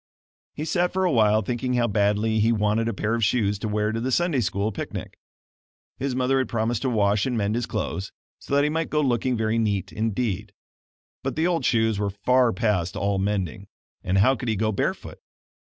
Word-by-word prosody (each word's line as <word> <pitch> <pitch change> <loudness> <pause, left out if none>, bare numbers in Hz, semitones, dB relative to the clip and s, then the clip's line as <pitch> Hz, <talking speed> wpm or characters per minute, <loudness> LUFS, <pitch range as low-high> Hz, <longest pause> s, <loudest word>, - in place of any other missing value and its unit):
He 150 - -4
sat 175 +1 +1
for 190 0 0
awhile 110 -9 +3
thinking 125 +4 -2
how 120 -1 +2
badly 105 +1 +1
he 110 +2 +3
wanted 110 +1 +1
a 115 - -1
pair 110 +3 -1
of 115 -1 0
shoes 105 -2 +1
to 110 - -3
wear 105 0 0
to 115 +1 -3
the 130 +2 -1
Sunday 170 0 +2
School 100 -1 -1
picnic. - - -6 0.8
His 135 -1 -2
mother 130 +1 +2
had 130 - -1
promised 115 0 -1
to 130 - 0
wash 105 -2 +2
and 125 -2 -1
mend 105 -1 0
his 120 0 -1
clothes, 95 +1 -3 0.3
so 140 - -3
that 145 - +4
he 150 - +2
might 165 +1 -1
go 150 - +1
looking 125 -2 +1
very 110 +1 0
neat 100 -4 -1
indeed; 110 -2 -2 0.7
but - - -3
the 160 - +1
old 175 -2 0
shoes 110 -3 +2
were 100 -1 0
far 125 +5 +2
past 105 -7 0
all 100 -1 0
mending 100 0 -2 0.4
and 95 +1 0
how 110 +8 +4
could 125 -2 -4
he 110 - +1
go 110 +2 0
barefoot? 100 - -3
110 Hz, 205 wpm, -24 LUFS, 105-125 Hz, 0.8 s, that